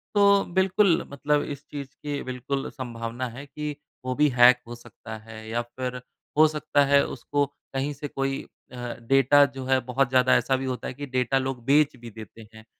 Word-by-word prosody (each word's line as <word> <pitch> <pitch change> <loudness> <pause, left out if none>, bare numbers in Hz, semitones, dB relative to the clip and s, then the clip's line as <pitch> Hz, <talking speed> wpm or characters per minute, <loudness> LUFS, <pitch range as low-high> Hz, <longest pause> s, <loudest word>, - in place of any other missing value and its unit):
तो 200 -1 +5
बिल्कुल 190 -1 +3
मतलब 145 +1 +1
इस 145 0 -7
चीज़ 140 -2 -5 0.2
की 145 -1 -3
बिल्कुल 130 +2 -3
संभावना 120 0 -5
है 130 +5 -9
कि 150 +1 -5 0.3
वो 130 - -1
भी 150 +2 +4
हैक 125 -1 +6
हो 120 - -7
सकता 115 -1 -10
है। 110 0 -11
या 120 +1 0
फ़िर 125 +1 -6 0.4
हो 155 - +8
सकता 150 -1 +1
है 140 0 +5
उसको 145 +3 -1 0.3
कहीं 135 +2 -1
से 145 +1 -6
कोई 135 -1 -2 0.3
अ, - - -10 0.3
डेटा 135 +4 +5
जो 135 -2 -7
है 130 0 +3
बहुत 130 +1 +1
ज़्यादा 130 -1 +4
ऐसा 130 - +2
भी 135 - -3
होता 130 -1 -3
है - - -5
कि 145 +2 -6
डेटा 130 0 0
लोग 130 -2 -3
बेच 145 +1 +4
भी 120 -1 -10
देते 110 0 -12
हैं। 110 0 -14
135 Hz, 195 wpm, -25 LUFS, 125-145 Hz, 0.4 s, हो